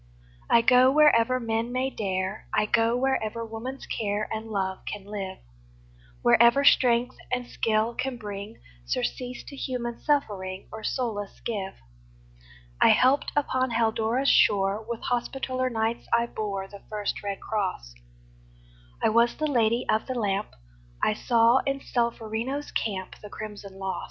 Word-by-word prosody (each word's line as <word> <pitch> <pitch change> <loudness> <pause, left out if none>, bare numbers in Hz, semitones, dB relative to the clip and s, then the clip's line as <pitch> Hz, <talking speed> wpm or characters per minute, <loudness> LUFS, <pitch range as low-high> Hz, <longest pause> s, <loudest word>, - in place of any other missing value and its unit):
I 235 - +6
go 255 +2 +6
wherever 255 -4 +5
men 230 0 -1
may 260 +2 -1
dare, 190 -1 -3
I - - +3
go 230 +2 +2
wherever 230 -3 -1
woman's 230 +4 -6
care 210 -1 -2
And 220 0 -4
love 190 -3 -2
can 205 -2 -7
live, 195 -2 -5 0.9
Wherever 235 +4 +6
strength 245 -2 +4
and 250 -1 -1
skill 225 -1 0
can 255 +1 -3
bring 205 0 -7 0.2
Surcease 245 - -3
to 280 - -10
human 245 -3 -4
suffering, 195 -10 -1
Or 220 0 -8
solace 215 -6 -3
give. 200 -4 -3 1.1
I - - +7
helped 265 +3 +4
upon 260 -3 +1
Haldora's 230 +3 +1
shore; 200 -1 +4
With 235 -1 -4
Hospitaller 255 +1 -1
Knights 225 0 -2
I 235 0 +3
bore 200 -4 -4
The 200 0 -12
first 210 -1 -3
red 200 -1 -4
cross; 190 - -3 1.1
I - - +5
was 235 +2 +3
the 310 - -2
Lady 235 -4 +2
of 215 - +1
the 260 - -3
Lamp; 205 -3 0 0.6
I - - +3
saw 235 +2 +4
in 275 0 0
Solferino's 235 +3 -2
camp 190 -4 -3
The 210 - -9
crimson 205 -3 -8
loss. 190 -1 -3
225 Hz, 140 wpm, -26 LUFS, 205-250 Hz, 1.1 s, I